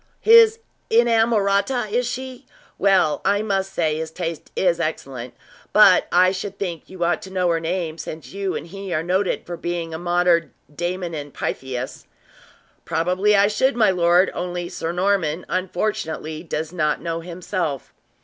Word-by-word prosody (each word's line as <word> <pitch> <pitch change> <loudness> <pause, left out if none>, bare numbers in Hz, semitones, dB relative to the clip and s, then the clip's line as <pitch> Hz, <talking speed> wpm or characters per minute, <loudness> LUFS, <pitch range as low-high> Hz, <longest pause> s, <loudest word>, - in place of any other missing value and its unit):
His 455 0 +7 0.3
inamorata, 225 0 +2
is 245 +2 +1
she? 255 0 -6 0.3
Well, 190 -6 +3
I 205 +2 +2
must 195 -2 -1
say 160 -4 0
his 160 0 -4
taste 165 -1 -5
is 175 -2 +2
excellent; 135 -6 -4 0.4
but - - +6
I 185 +1 +5
should 195 +1 -5
think 175 -5 -5
you 185 -2 -4
ought 175 +1 +1
to 190 - -9
know 185 -2 0
her 165 -1 +1
name, 165 -1 -3
since 155 -3 -7
you 195 -1 -2
and - - -4
he 195 +2 -8
are 155 - 0
noted 185 +3 0
for 175 -1 -6
being 170 -1 -4
a 160 - -4
modern 175 -1 +2 0.2
Damon 175 +1 -3
and 145 -2 -6
Pythias." 130 -1 -5 0.8
"Probably 185 +5 +1
I 200 0 +5
should, 245 +6 +1
my 220 -4 +4
lord, 175 +1 +3
only 175 0 -4
Sir 165 - -4
Norman, 180 -3 0
unfortunately, 175 -4 -3
does 160 -1 -4
not 155 -4 0
know 165 -1 -3
himself." 170 - -4
180 Hz, 160 wpm, -22 LUFS, 165-200 Hz, 0.8 s, His